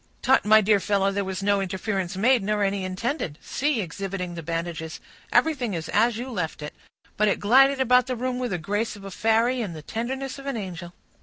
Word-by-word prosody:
"Tut—my 215 Hz, -4 st, +5 dB
dear 210 Hz, 0 st, +3 dB
fellow, 195 Hz, 0 st, +1 dB
there 200 Hz, 0 st, -1 dB
was 190 Hz, 0 st, -4 dB
no 200 Hz, 0 st, +2 dB
interference 190 Hz, -1 st, -3 dB
made, 245 Hz, +4 st, +4 dB
nor 210 Hz, +1 st, 0 dB
any 195 Hz, -1 st, 0 dB
intended. 185 Hz, -, -3 dB
See," 280 Hz, -4 st, -1 dB
exhibiting 185 Hz, 0 st, -5 dB
the 170 Hz, -, -6 dB
bandages, 165 Hz, 0 st, -4 dB, 0.3 s
"everything 265 Hz, -, +2 dB
is 160 Hz, -1 st, -5 dB
as 225 Hz, +2 st, +2 dB
you 255 Hz, +2 st, -5 dB
left 165 Hz, -7 st, -3 dB
it,—but 205 Hz, +7 st, -5 dB
it 200 Hz, -, +1 dB
glided 270 Hz, +6 st, +5 dB
about 250 Hz, 0 st, +4 dB
the 255 Hz, -, -2 dB
room 250 Hz, +1 st, -2 dB
with 250 Hz, -1 st, -2 dB
the 180 Hz, -, -1 dB
grace 205 Hz, +8 st, -2 dB
of 200 Hz, -, -12 dB
a 195 Hz, -, -7 dB
fairy 225 Hz, +5 st, +2 dB
and 190 Hz, -7 st, -4 dB
the 155 Hz, -, -9 dB
tenderness 260 Hz, -, -4 dB
of 275 Hz, -, -9 dB
an 275 Hz, -4 st, -2 dB
angel." 175 Hz, -4 st, -6 dB
205 Hz, 205 wpm, -25 LUFS, 185-245 Hz, 0.3 s, Tut—my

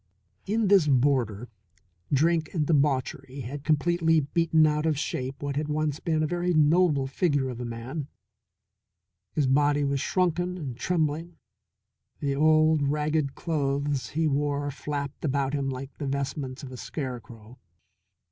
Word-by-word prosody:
In 215 Hz, +1 st, +1 dB
this 190 Hz, -5 st, +5 dB
boarder 125 Hz, -5 st, +2 dB, 0.6 s
drink 160 Hz, +3 st, +2 dB
and 155 Hz, -3 st, +1 dB
debauchery 140 Hz, -2 st, 0 dB
had 135 Hz, +4 st, -6 dB
completely 165 Hz, +2 st, +2 dB
beaten 160 Hz, +2 st, +3 dB
out 150 Hz, +1 st, +1 dB
of 155 Hz, -3 st, +1 dB
shape 135 Hz, -1 st, -4 dB
what 140 Hz, -1 st, -2 dB
had 150 Hz, 0 st, -1 dB
once 150 Hz, -1 st, -1 dB
been 155 Hz, -2 st, 0 dB
a -, -, +2 dB
very 175 Hz, +2 st, 0 dB
noble 155 Hz, -2 st, +4 dB
figure 140 Hz, -1 st, 0 dB
of 125 Hz, -1 st, -6 dB
a -, -, -4 dB
man. 120 Hz, +6 st, -5 dB, 1.3 s
His 150 Hz, -, +1 dB
body 145 Hz, +2 st, +3 dB
was 140 Hz, -1 st, 0 dB
shrunken 180 Hz, 0 st, 0 dB
and 140 Hz, -8 st, -5 dB
trembling; 165 Hz, +2 st, -1 dB, 0.8 s
the 140 Hz, -2 st, -1 dB
old, 155 Hz, +1 st, +4 dB
ragged 150 Hz, -1 st, 0 dB
clothes 140 Hz, -3 st, -1 dB
he 160 Hz, +2 st, 0 dB
wore 145 Hz, 0 st, 0 dB
flapped 140 Hz, 0 st, -5 dB
about 140 Hz, -2 st, 0 dB
him 140 Hz, -2 st, -1 dB
like 135 Hz, +1 st, -6 dB
the 145 Hz, -, -3 dB
vestments 135 Hz, 0 st, -3 dB
of 130 Hz, -, -8 dB
a 130 Hz, -, -8 dB
scarecrow. 120 Hz, -4 st, -7 dB
145 Hz, 145 wpm, -27 LUFS, 135-155 Hz, 1.3 s, this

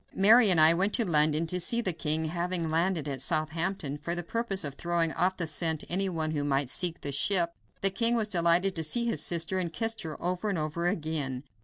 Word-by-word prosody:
Mary 215 Hz, +3 st, +6 dB
and 175 Hz, -3 st, +5 dB
I 155 Hz, +1 st, +7 dB
went 195 Hz, +5 st, 0 dB
to 235 Hz, -, +3 dB
London 155 Hz, -1 st, +2 dB
to 180 Hz, +3 st, +1 dB
see 235 Hz, +7 st, +1 dB
the 190 Hz, -7 st, -1 dB
king, 160 Hz, 0 st, -2 dB
having 170 Hz, 0 st, -3 dB
landed 165 Hz, -2 st, 0 dB
at 135 Hz, -3 st, -5 dB
Southampton 155 Hz, 0 st, -2 dB
for 170 Hz, +3 st, -3 dB
the 175 Hz, -, -4 dB
purpose 200 Hz, 0 st, -3 dB
of 140 Hz, -2 st, -4 dB
throwing 170 Hz, +1 st, -1 dB
off 185 Hz, +3 st, 0 dB
the 170 Hz, -, -1 dB
scent 160 Hz, 0 st, -1 dB
any 195 Hz, +2 st, -1 dB
one 160 Hz, -3 st, -2 dB
who 145 Hz, -2 st, -2 dB
might 140 Hz, -2 st, 0 dB
seek 175 Hz, -2 st, -1 dB
the 140 Hz, -, -3 dB
ship. 170 Hz, +4 st, +2 dB, 0.3 s
The 195 Hz, -, +3 dB
king 230 Hz, +4 st, +2 dB
was 220 Hz, -2 st, -1 dB
delighted 175 Hz, 0 st, +1 dB
to 160 Hz, -, -2 dB
see 235 Hz, +10 st, 0 dB
his 230 Hz, -, 0 dB
sister, 170 Hz, +2 st, +1 dB
and 175 Hz, -3 st, -2 dB
kissed 225 Hz, +4 st, -1 dB
her 160 Hz, -2 st, -7 dB
over 180 Hz, +4 st, -3 dB
and 195 Hz, -, -2 dB
over 155 Hz, +3 st, -2 dB
again. 155 Hz, -7 st, -3 dB
170 Hz, 225 wpm, -28 LUFS, 155-190 Hz, 0.3 s, I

